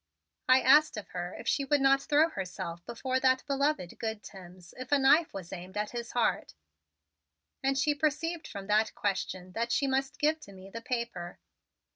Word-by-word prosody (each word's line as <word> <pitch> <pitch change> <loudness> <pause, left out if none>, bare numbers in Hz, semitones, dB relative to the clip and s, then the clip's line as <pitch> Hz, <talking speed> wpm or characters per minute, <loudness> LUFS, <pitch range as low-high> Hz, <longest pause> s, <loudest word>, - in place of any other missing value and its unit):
"I 255 +1 +7
asked 295 0 +5
of 210 - -7
her 175 0 -5
if - - -9
she 280 - +2
would 285 +1 +2
not 275 0 +4
throw 300 +3 +3
herself 175 - -6
before 255 +2 -1
that 260 0 +2
beloved 280 - -1
good 220 -2 -4
Timms 180 -2 -12
if 255 +1 -8
a 290 - +6
knife 290 +4 +4
was 190 -2 -8
aimed 185 +2 -8
at 210 0 -2
his 235 -1 -6
heart; 240 - 0 1.1
and 270 0 +1
she 295 +2 +2
perceived 310 +3 -1
from 200 -2 -7
that 215 +2 +2
question 185 -2 -3
that 230 +5 -2
she 280 - +2
must 270 0 -1
give 310 +2 +1
to 200 -10 -13
me 190 +1 -12
the 230 - -6
paper. 235 -8 -4
245 Hz, 185 wpm, -30 LUFS, 195-280 Hz, 1.1 s, I